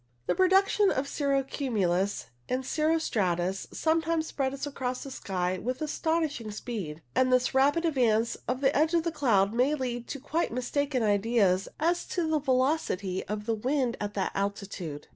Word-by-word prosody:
The - - +1
production 385 +2 +4
of 270 -3 -1
cirro 275 -2 0
cumulus 205 - -1 0.2
and 255 +1 -1
cirro 315 +4 +1
stratus 190 - -1
sometimes 325 0 +1
spreads 275 -2 -2
across 255 -3 -3
the 275 - -8
sky 185 -5 -2
with 255 +5 -3
astonishing 310 -5 -1
speed, 200 -8 -5
and 255 0 +3
this 255 0 +3
rapid 285 +6 +3
advance 235 -7 +2
of 250 +2 -1
the 275 0 +3
edge 315 +3 +3
of 335 - +3
the 335 - -1
cloud 225 -10 +2
may 255 +5 +2
lead 245 -3 -4
to 275 - -5
quite 320 +5 -1
mistaken 255 +1 -1
ideas 205 -2 +2
as 340 +3 +1
to 345 -3 -1
the 315 -1 +2
velocity 255 - 0
of 210 +1 -4
the 230 - 0
wind 250 +2 0
at 205 0 -3
that 195 -2 -1
altitude. 195 -6 -4
255 Hz, 165 wpm, -28 LUFS, 205-300 Hz, 0.2 s, production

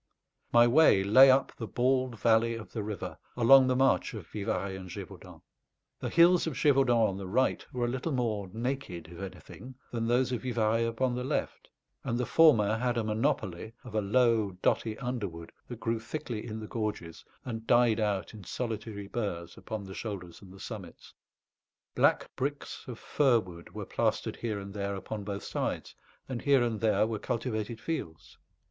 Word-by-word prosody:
My 120 0 +7
way 120 -7 +5
lay 130 +7 +8
up 130 +1 +4
the 115 - -5
bald 130 -1 0
valley 115 0 +3
of 115 -1 -9
the 110 - -3
river, 105 -3 -5 0.2
along 130 +2 +7
the 130 - +2
march 135 -2 +2
of 100 -6 -7
Vivarais 100 0 -3
and 95 -1 -8
Gévaudan. - - -10 0.6
The - - -3
hills 170 +1 +5
of 160 - -2
Gévaudan 125 -5 +4
on 95 -2 -3
the 95 -1 -6
right 130 +8 +1
were 125 -1 -1
a - - -1
little 130 +6 -2
more 110 -7 -1
naked, 115 -8 -4
if 85 - -9
anything, 95 +7 -9 0.2
than 115 -1 -2
those 125 +2 +2
of 120 -3 -2
Vivarais 115 -2 +1
upon 120 +2 0
the 125 0 -3
left, 130 - -3 0.3
and 115 - -1
the 125 - 0
former 115 -11 +5
had 125 +1 0
a 115 - +1
monopoly 110 -2 -1
of 120 - -10
a 110 - +1
low 110 -1 +2
dotty 110 -1 +1
underwood 100 -10 -5 0.2
that 120 -2 -8
grew 115 0 -1
thickly 115 -2 -5
in 110 -1 -5
the 110 - -6
gorges 105 -8 -4 0.2
and 115 -2 -6
died 120 -2 +4
out 105 -2 -1
in 105 -3 -10
solitary 110 -1 -5
burrs 100 -7 -4
upon 110 -2 -6
the 95 -1 -9
shoulders 90 -6 -6
and 95 -2 -13
the 95 - -13
summits. 95 -6 -9 0.8
Black - - +2
bricks 145 +2 -4
of 120 -3 -6
fir 130 -2 +3
wood 85 -4 -11
were - - -5
plastered - - -1
here 110 -3 -3
and 100 0 -8
there 100 -1 -3
upon 100 +2 -6
both 100 0 -5
sides, - - -3 0.3
and 125 -3 -4
here 140 -3 +4
and 115 -3 -1
there 110 -2 +3
were 110 -1 -3
cultivated 115 -2 -3
fields. 85 - -6
115 Hz, 180 wpm, -30 LUFS, 100-125 Hz, 0.8 s, lay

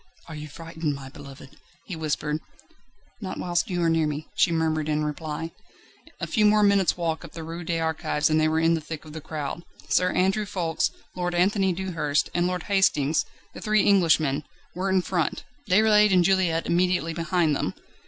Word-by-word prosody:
"Are 160 - -8
you 150 0 -7
frightened, 160 -1 -4
my 135 -1 -9
beloved?" 140 -1 -12 0.3
he 185 - -6
whispered. 155 -1 -2 0.8
"Not 185 -2 -5
whilst 175 +1 -1
you 175 -2 -1
are - - +3
near 165 -1 +2
me," 150 +1 -4
she 170 - +3
murmured 160 -2 0
in 150 0 +1
reply. 155 +2 -4 0.7
A - - -2
few 215 - +1
more 210 0 +5
minutes' 200 -3 +3
walk 165 -2 -2
up 170 - -11
the 165 0 -7
Rue 165 +2 -6
des 165 0 -1
Archives 160 -2 0
and 155 0 +2
they 155 - +3
were 160 +1 +1
in 165 +1 +3
the 165 - -1
thick 155 0 -7
of 155 - -11
the 160 - -7
crowd. 150 +2 -5 0.3
Sir 180 0 +3
Andrew 195 +3 +1
Ffoulkes, 170 -5 0 0.3
Lord 175 -1 -2
Anthony 190 +2 +2
Dewhurst, 170 -5 -1
and 175 0 +1
Lord 180 -2 -2
Hastings, 165 -7 +2 0.3
the - - -9
three 215 -1 +2
Englishmen, 160 -7 +3 0.3
were 185 +3 -2
in 190 -1 +2
front; 170 -5 -1 0.3
Déroulède 210 +1 +5
and 180 -2 +5
Juliette 180 -3 +2
immediately 175 -1 +1
behind 165 -2 +1
them. - - -2
165 Hz, 190 wpm, -25 LUFS, 155-185 Hz, 0.8 s, more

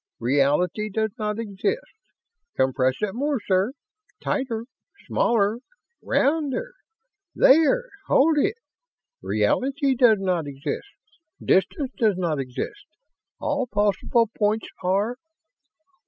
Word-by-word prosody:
Reality 145 - +1
does 220 +1 -1
not 210 0 -2
exist! 230 - -3 0.6
Compress 130 0 +2
it 210 -2 -1
more, 280 +2 -1
sir. 195 +3 +1 0.5
Tighter! 235 -5 -2 0.4
Smaller! 220 -1 +1 0.4
Rounder! 315 - 0 0.6
There! 325 - +5 0.2
Hold 300 +2 +4
it! 400 +9 +1 0.7
Reality 275 +1 +1
does 240 -4 +5
not 180 -5 -1
exist 140 - -5 0.5
distance 250 - +1
does 215 -6 +3
not 165 -5 -1
exist 135 - -5 0.5
all 285 -3 -1
possible 210 +2 +1
points 215 +1 +1 0.2
are.... 200 +6 0
220 Hz, 95 wpm, -24 LUFS, 185-275 Hz, 0.7 s, There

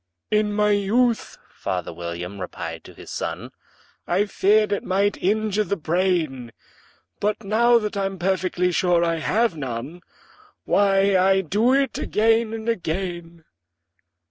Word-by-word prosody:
"In 210 0 +2
my 210 0 +2
youth," 220 +4 +1
father 90 -3 -4
William 85 +3 -6
replied 90 - -6
to - - -12
his - - -11
son, - - -5 0.6
"I 190 +4 +2
feared 210 +1 +2
it 205 - -1
might 200 +2 +1
injure 215 +1 +1
the 200 - -2
brain; 160 -8 -1 0.7
But, 210 +2 -1
now 235 +4 +4
that 215 -1 -3
I'm 195 -1 -2
perfectly 180 0 0
sure 175 -1 +2
I 165 -1 0
have 215 +5 +1
none, 135 +4 -6 0.6
Why, 195 -1 +3
I 190 +1 +4
do 210 +8 +1
it 275 0 0
again 225 +1 +2
and 225 0 -6
again." 175 -4 -3
195 Hz, 135 wpm, -23 LUFS, 170-210 Hz, 0.7 s, now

